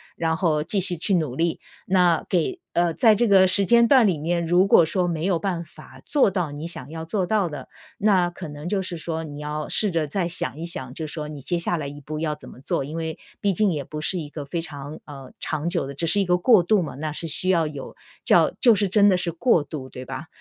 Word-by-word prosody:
然 160 -1 -1
后 155 -5 +1
继 195 +6 0
续 180 -1 -1
去 185 +5 -1
努 155 -8 -1
力。 165 +2 -1 0.3
那 180 -3 +3
给 175 -4 0 0.2
呃， 170 -1 +1
在 220 +5 +5
这 235 +3 +1
个 190 -2 +5
时 200 +1 +5
间 235 +2 +5
段 245 -2 +5
里 180 -5 +1
面， 170 +3 -1
如 175 +3 +3
果 175 -4 +5
说 180 +3 0
没 165 -2 -2
有 185 -3 +1
办 180 -1 -2
法 155 - -15
做 280 -9 +2
到 175 -6 -2
你 145 +2 -7
想 145 -6 -4
要 160 +1 -6
做 180 +3 -2
到 200 -3 0
的， 145 -3 -8 0.3
那 195 -5 +2
可 175 -1 -9
能 145 +3 -7
就 200 -1 0
是 180 -2 -4
说 160 0 -4
你 145 -1 -8
要 150 +1 -4
试 210 -3 +4
着 165 -3 -1
再 180 +5 -1
想 170 -2 +1
一 165 - -5
想， 130 -7 -3
就 160 +3 -5
说 155 0 -5
你 150 -2 -8
接 175 +6 -1
下 170 - 0
来 155 -4 -4
一 145 +1 -8
步 150 +2 -7
要 155 -2 -1
怎 150 - -12
么 125 - -14
做， 135 - -2
因 150 +3 -7
为 160 -1 -4 0.2
毕 200 - +2
竟 195 0 +1
也 145 -2 -3
不 150 +2 -7
是 180 +4 0
一 155 -4 -5
个 150 -1 -7
非 165 +4 -3
常， 145 -2 -8
呃， 135 -3 -11
长 155 +1 -3
久 170 -4 -1
的， 140 - -7
只 155 +5 -2
是 200 +6 +4
一 - - +2
个 180 0 +2
过 205 0 +5
渡 205 +2 +2
嘛， 155 - -5
那 155 +2 -4
是 165 +2 -1
需 185 +4 +1
要 165 -4 +2
有 145 -3 -8 0.3
叫 - - +4
就 240 -3 +7
是 205 -1 +1
真 205 +2 +4
的 185 - +3
是 175 -1 -2
过 175 0 +2
渡， 140 -2 -7
对 125 0 -9
吧？ 155 - -7
165 Hz, 280 characters per minute, -23 LUFS, 150-185 Hz, 0.3 s, 就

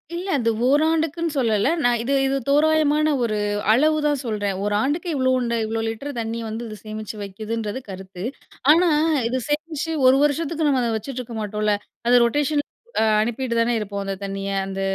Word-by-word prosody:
இல்ல, 355 +3 -4
அது 230 -2 +1 0.2
ஓராண்டுக்குன்னு 320 +3 +1
சொல்லல 225 +1 +2
நான். 245 0 +3
இது, 270 +4 0
இது 270 +1 0
தோராயமான 305 +1 +3
ஒரு 220 -2 0 0.4
அளவுதான் 295 +2 +2
சொல்லுறேன். 205 -4 -2
ஒரு 205 0 0
ஆண்டுக்கு 310 +7 -1
இவ்ளோ 260 -1 +2 0.3
இவ்ளோ 225 +1 -2
லிட்டர் 225 +6 -4
தண்ணீ 230 0 -3
வந்து 220 +2 -5
இது 215 - -7
சேமிச்சு 215 0 -6
வைக்குதுன்றது 215 +3 -4
கருத்து. 190 -1 -8 0.5
ஆனா, 345 +3 +5 0.4
இது 255 +2 -1
சேமித்து 310 +1 -2
ஒரு 260 +1 +6
வருஷத்துக்கு 310 +2 0
நம்ம 270 -3 +2
அதை 235 - 0
வச்சுட்டு 255 +4 -5
இருக்க 235 -2 -9
மாட்டோம்ல, 210 0 0 0.3
அது 245 - +5
ரொட்டேஷன் 290 +4 +1 0.6
அனுப்பிவிட்டு 240 +1 -2
தானே 235 +1 +1
இருப்போம். 200 -1 -4
அந்த 195 0 -3
தண்ணீய 195 0 -4
அந்த 195 0 -4
245 Hz, 160 wpm, -22 LUFS, 215-295 Hz, 0.6 s, ஒரு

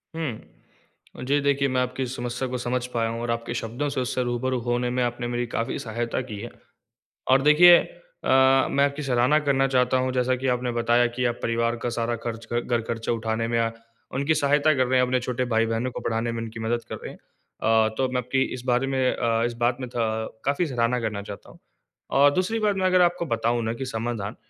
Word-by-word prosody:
हुँ, 140 -4 -9
जी 140 +2 +2
देखिए 140 0 +2
मैं 130 0 +1
आपकी 125 +1 -2
समस्या 125 0 -4
को 125 - -3
समझ 125 0 -2
पाया 115 -1 0
हूँ 115 +1 -4
और 120 0 -2
आपके 115 0 -3
शब्दों 120 +5 -3
से 140 -2 -2
उससे 125 0 -1
रूबरू 125 +1 -1
होने 120 +1 -1
में 125 +1 -1
आपने 120 0 -2
मेरी 120 0 -2
काफ़ी 115 0 -2
सहायता 115 +2 -3
की 110 -5 -7
है। 120 +3 -6 0.8
और 135 +1 +6
देखिए 165 +5 +8
अ, 135 - +1
मैं 140 0 +3
आपकी 140 +1 -3
सराहना 125 +3 +3
करना 135 -2 +2
चाहता 125 -1 +2
हूँ 130 0 0
जैसा 130 0 +1
कि 130 +1 -3
आपने 125 0 -3
बताया 120 +1 +2
कि 125 0 0
आप 120 0 -1
परिवार 115 0 0
का 120 - 0
सारा 120 0 0
ख़र्च 115 -1 -5
घर 120 0 0
ख़र्चा 115 0 -2
उठाने 115 0 -1
में 115 0 0
या 115 0 +1 0.4
उनकी 140 +4 +1
सहायता 145 +1 +3
कर 130 -1 +2
रहे 130 0 +3
हैं 125 - +4
अपने 130 0 +1
छोटे 125 0 -2
भाई-बहनों 115 +2 +1
को - - -6
पढ़ाने 115 +1 -1
में 115 0 -4
उनकी 115 0 -8
मदद 115 +1 -1
कर - - -4
रहे - - -8
हैं - - -13
अ, 110 0 -1
तो 130 - +1
मैं 125 - -2
आपकी 125 +2 -1
इस 125 - -7
बारे 125 +2 +2
में 130 -1 +1
अ, 115 -1 0
इस 120 - -2
बात 120 +1 +2
में 125 - -4
अ, - - -13 0.6
काफ़ी 140 +6 +1
सराहना 125 -2 0
करना 110 -3 -3
चाहता 100 0 -10
हूँ। - - -18 0.6
और 145 +1 +7
दूसरी 185 +7 0
बात 210 -2 +1
मैं 190 -1 0
अगर 185 0 +4
आपको 175 0 +2
बताऊँ 115 +1 0
ना 110 0 -1
कि 130 +3 -5
समाधान 115 -3 -4
125 Hz, 225 wpm, -25 LUFS, 115-135 Hz, 0.8 s, देखिए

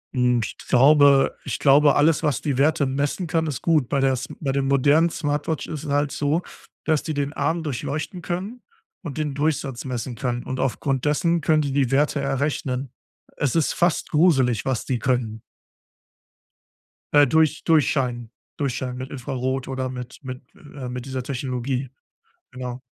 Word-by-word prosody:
Hm, 125 -2 +2
ich - - -6
glaube 140 +1 +5
ich - - -3
glaube 145 +1 +5
alles, 150 +2 +3
was 150 -5 0
die 140 -4 -1
Werte 150 0 +3
messen 140 +7 -1
kann, 160 0 0
ist 145 -5 -4
gut. 155 -7 +2
Bei 140 - +1
der 135 0 +3
s 130 - -4
bei 140 -4 -1
der 140 - 0
modernen 140 +5 +3
Smartwatch 150 -1 -2
ist 155 -3 -6
es - - -5
halt 145 0 +1
so, 150 +4 0 0.4
dass 155 -2 +2
die 155 -1 -3
den 145 0 -2
Arm 160 +4 -1
durchleuchten 155 +5 -4
können 195 +9 -4 0.4
und 160 -5 -7
den 150 -2 -2
Durchsatz 140 -3 -2
messen 125 -1 -4
können, 120 0 -2
und 130 0 -5
aufgrund 135 0 -1
dessen 165 +3 +2
können 155 +1 +3
sie 140 -1 -2
die 140 -3 +2
Werte 145 +1 +2
errechnen. 135 -2 -2 0.5
Es 145 +1 0
ist 165 - +2
fast 175 -1 0
gruselig, 135 -9 +3
was 130 -3 -1
die 125 -3 -1
können. 115 -3 -1 1.7
Äh, 145 -1 +6
durch 155 +1 +2
durchscheinen 125 -7 +1 0.3
durchscheinen 130 -3 -2
mit 130 +2 -7
Infrarot 130 0 -3
oder 130 -1 -3
mit 125 -1 -7
mit 130 -1 -6
äh, 140 -4 -9
mit 125 0 -6
dieser 130 -1 -4
Technologie. 130 -1 -3 0.6
Genau. 125 0 -6
140 Hz, 165 wpm, -23 LUFS, 130-150 Hz, 1.7 s, Äh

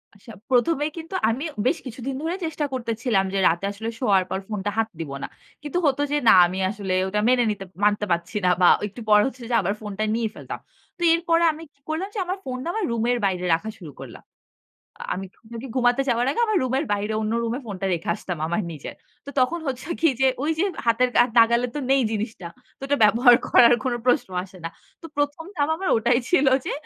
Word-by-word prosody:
আচ্ছা, 200 +3 -14 0.2
১ম 260 +7 +3
এই 310 - -3
কিন্তু 330 +3 -7
আমি 240 +5 -2 0.2
বেশ 330 - +2
কিছুদিন 255 +2 -5
ধরে 330 +3 -2
চেষ্টা 310 -2 -2
করতেছিলাম 230 -4 0
যে, 195 - +1
রাতে 170 +4 0
আসলে 220 +3 -5
শোয়ার 200 -7 +3
পর 190 - -2
ফোনটা 205 -1 -3
হাত 225 0 +2
দিব 160 -4 -5
না। - - -3 0.3
কিন্তু 295 +3 -3
হতো 285 0 +2
যে, 295 - +2
না, - - +9
আমি 185 +2 -5
আসলে 200 -2 -3
ওটা 205 +2 -1
মেনে 250 0 +4
নিতে 195 -2 -6 0.2
মানতে 210 0 +2
পারছি 170 +5 -1
না। - - +5
বা 180 - +7 0.2
একটু 205 +4 -12
পরে 210 0 +6
হচ্ছে 260 -2 -8
যে, 240 - +1
আবার 195 +2 -1
ফোনটা 210 0 -4
নিয়ে 230 -1 -1
ফেলতাম। - - -7 0.4
তো - - -15
এরপরে 335 0 +2
আমি 315 +1 -10
কি - - -37
করলাম 320 +5 -2
যে, - - -2
আমার 370 +2 -3
ফোনটা 255 +3 -5
আমার 440 -3 -1
রুমের 235 +1 +1
বাইরে 180 -2 -1
রাখা 185 +7 -1
শুরু 170 -8 -10
করলাম। - - -11 0.9
আমি 190 +1 -5
ঘু - - -32 0.3
ঘুমাতে 245 +1 +3
যাওয়ার 240 0 +1
আগে, 285 - -2
আমার 430 -3 +1
রুমের 260 +4 0
বাইরে 205 +1 -2
অন্য 215 +1 -1
রুমে 230 +3 -2
ফোনটা 195 -3 -5
রেখে 170 -1 -3
আসতাম 180 -4 -5
আমার 175 +6 -1
নিজের। 150 -3 -8 0.3
তো - - -7
তখন 290 +7 +1
হচ্ছে 260 +2 -4
কি 325 - +5
যে, 265 - +5 0.2
ওই 310 - +1
যে - - +3 0.2
হাতের 235 +2 +3
আর 245 - -3
নাগালে 235 +2 +5
তো - - -1
নেই 270 0 +4
জিনিসটা। 215 -4 -4 0.3
তো - - -44
ওটা 285 +1 +1
ব্যবহার 240 +4 +6
করার 240 0 +6
কোনো 250 -2 -1
প্রশ্ন 250 -3 +2
আসে 190 0 -14
না। - - -2 0.3
তো - - -10
১ম 290 +2 -1
ধাপ 290 -2 0
আমার 375 +3 -3
ওটাই 240 +2 +2
ছিল 290 -6 +3 0.2
যে, - - -2
240 Hz, 215 wpm, -23 LUFS, 205-280 Hz, 0.9 s, না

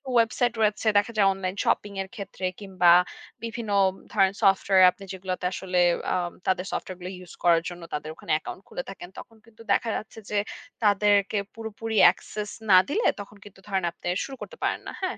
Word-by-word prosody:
ওয়েবসাইটে 235 0 +2
রয়েছে 215 +1 +1
দেখা 205 +3 +2
যায় 200 - +5
অনলাইন 190 0 -4
শপিং 205 -1 0
এর 190 - -7
ক্ষেত্রে 195 -3 -6
কিংবা 185 -4 +3 0.5
বিভিন্ন 230 -2 -4 0.4
ধরেন 190 0 +3
সফটওয়্যার 190 -1 +5
আপনি 195 - -14
যেগুলাতে 185 -1 -4
আসলে 185 -1 -1 0.3
আ - - +1 0.3
তাদের 185 0 +1
সফটওয়্যার 185 -1 -5
গুলো 180 - -5
ইউস 180 -1 -12
করার 170 -1 +5
জন্য 175 0 -10
তাদের 150 +1 -4
ওখানে - - -7
অ্যাকাউন্ট 155 - -5
খুলে 265 - -5
থাকেন। 185 -2 -9
তখন 225 - -13
কিন্তু 230 0 -18
দেখা 230 - +1
যাচ্ছে 220 +1 -9
যে 210 - -1 0.5
তাদেরকে 205 0 +3 0.2
পুরোপুরি 225 0 -5 0.2
access 210 +3 -7 0.2
না 185 - +9
দিলে 430 +11 +1
তখন 205 +1 -9
কিন্তু 200 -1 -14
ধরেন 195 -3 -1
আপনে 170 - -10 0.2
শুরু 270 - -7
করতে - - -9
পারেন - - 0
না, - - -4
হ্যাঁ? 375 0 -2
200 Hz, 180 wpm, -26 LUFS, 185-220 Hz, 0.5 s, না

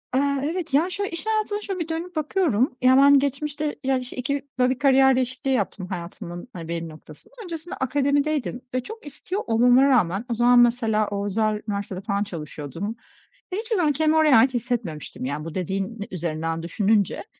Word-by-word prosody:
Eee, 265 - +4 0.3
evet, 345 -5 -4
ya, 315 +6 +3
şöyle, 400 +2 -3
iş 335 +2 -5
hayatıma 430 -1 0
şöyle 390 -3 -4
bir 330 - -3
dönüp 335 +2 -5
bakıyorum. 295 - +1
Ya, 255 +1 +6
ben 280 0 +7
geçmişte, 290 +2 -2
ya, 265 0 +2
işte, 250 -1 -6
2 280 +3 -2
böyle, 250 0 +4
bir 255 - -12
kariyer 265 -1 +5
değişikliği 255 +1 -2
yaptım 200 -5 -2
hayatımın, 175 +1 -7
hani, 165 -3 -7
belli 165 0 -4
noktasında. 155 - -14
Öncesinde 335 -2 -6
akademideydim 280 -1 0
ve 255 -1 -1
çok 445 - -10
istiyor 355 +7 -5
olmama 245 +3 +5
rağmen 225 -7 +2
o - - 0
zaman 240 +1 +5
mesela 230 -3 +3
o 200 0 -3
özel 215 +1 0
üniversitede 200 -2 -4
falan 200 0 -1
çalışıyordum 165 - -6 0.6
ve - - -1
hiçbir 445 +1 -2
zaman 320 -5 +2
kendimi 310 +2 +2
oraya 310 -5 +5
ait 255 +3 +4
hissetmemiştim, 225 - -3
yani, 145 +3 -3
bu 165 -1 -7
dediğin 195 +4 -3
üzerinden 165 -2 -3
düşününce. 200 +3 +1
250 Hz, 180 wpm, -24 LUFS, 200-295 Hz, 0.6 s, ben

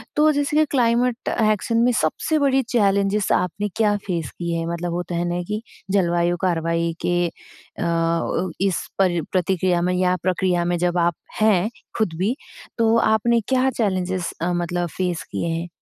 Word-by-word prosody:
तो 305 +1 +5
जैसे 290 0 -1
कि 310 - +5
क्लाइमेट 245 -1 +1 0.2
एक्शन 220 +2 -1
में 240 +2 +4
सबसे 235 - 0
बड़ी 270 -2 +3
चैलेंजेज़ 200 -2 +2
आपने 205 +4 0
क्या 210 -2 +2
फ़ेस 170 -5 -2
किए 170 -1 -3
हैं 165 - -2
मतलब 170 0 -3
होता 175 0 -3
है 170 +1 0
ना 175 +1 -1
कि 210 +1 -3 0.3
जलवायु 175 -2 +2
कार्यवाही 165 -2 0
के 175 0 +1
अ, 170 - -11
अव 170 +1 0
इस 195 -3 0
पर 175 -3 +3
प्रतिक्रिया 180 -1 +1
में 180 +1 +1
या 180 0 +2
प्रक्रिया 180 -1 +1
में 175 0 0
जब 175 +1 0
आप 170 -1 +2 0.3
हैं 215 -1 +3 0.3
खुद 215 -7 0
भी 205 +9 0 0.4
तो 225 -1 +3
आपने 230 +2 +3
क्या 260 0 +2
चैलेंजेज़ 185 -4 -1
अ, 175 +1 0
मतलब 175 0 -1
फ़ेस 180 -3 -1
किए 170 - -2
हैं? 165 +1 -2
180 Hz, 170 wpm, -22 LUFS, 175-220 Hz, 0.4 s, तो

